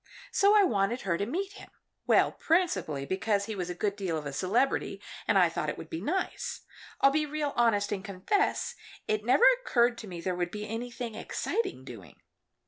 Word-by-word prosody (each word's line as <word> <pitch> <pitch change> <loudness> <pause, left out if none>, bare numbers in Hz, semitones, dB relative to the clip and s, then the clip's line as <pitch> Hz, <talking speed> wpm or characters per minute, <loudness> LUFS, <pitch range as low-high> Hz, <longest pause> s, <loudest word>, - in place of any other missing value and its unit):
So 400 +1 +4
I 415 - +7
wanted 225 - +1
her 180 -3 0
to 200 +4 -2
meet 380 +9 -2
him - - -12 0.4
well, - - +5
principally 315 - 0
because 200 +4 0
he 220 - -4
was 180 -2 -3
a 180 - -4
good 200 +2 -1
deal 185 -5 -2
of 150 - -6
a 140 - -4
celebrity, 210 - 0 0.3
and - - +4
I - - +6
thought - - -2
it - - -4
would - - -10
be 325 - -4
nice. 375 +6 -2 0.4
I'll 275 - +6
be 305 +1 +1
real 295 -1 -2
honest 210 -4 +2
and 195 -2 -2
confess 200 - 0 0.3
it 215 0 0
never 255 - +5
occurred 240 - +2
to 220 - -8
me 175 -3 -7
there 180 +2 -2
would 175 -1 -2
be 210 +3 -6
anything 235 +1 -5
exciting 220 - -3
doing. 115 -8 -11
215 Hz, 200 wpm, -29 LUFS, 185-280 Hz, 0.4 s, I